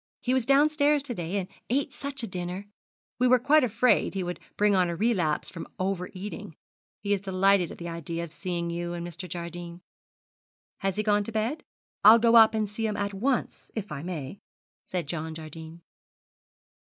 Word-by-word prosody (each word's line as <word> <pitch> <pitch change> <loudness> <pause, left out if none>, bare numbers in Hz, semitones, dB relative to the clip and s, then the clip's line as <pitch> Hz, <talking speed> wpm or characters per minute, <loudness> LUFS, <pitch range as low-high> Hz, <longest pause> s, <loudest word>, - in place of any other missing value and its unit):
He 250 - 0
was 260 -3 +1
downstairs 290 +1 +4
to 270 -4 -1
day, 175 -1 -3
and 190 -2 -2 0.2
ate 275 +3 0
such 280 -3 -4
a - - -2
dinner. 180 +1 -4 0.5
We 250 - +4
were 255 +1 +6
quite 285 +5 +4
afraid 245 -2 +2
he 190 - -1
would 175 0 -4 0.2
bring 210 0 +4
on 180 -2 +3
a 170 - -2
relapse 175 -7 +1
from 165 - -7
over 185 -1 -2
eating. 190 -4 -7 0.5
He 205 0 +1
is 200 - 0
delighted 190 -2 +3
at - - -9
the 170 - -6
idea 170 0 -4
of 170 - -8
seeing 170 -1 -3
you 175 0 -3
and 170 0 -4
Mr. 175 +1 -7
Jardine.' 175 0 -7 1.0
'Has 195 -1 -1
he 215 - 0
gone 205 -1 +2
to 230 - +1
bed? 225 +8 -2 0.4
I'll 215 +3 +10
go 230 0 +4
up 225 -1 +8
to 220 -1 +1
see 215 +2 -3
him 210 - -2
at 200 0 -2
once, 245 +6 -1
if 210 -5 -4
I 145 -2 -4
may,' 165 0 -6 0.5
said 180 -2 -3
John 160 +1 -4
Jardine. 160 +1 -9
195 Hz, 190 wpm, -27 LUFS, 170-230 Hz, 1.0 s, I'll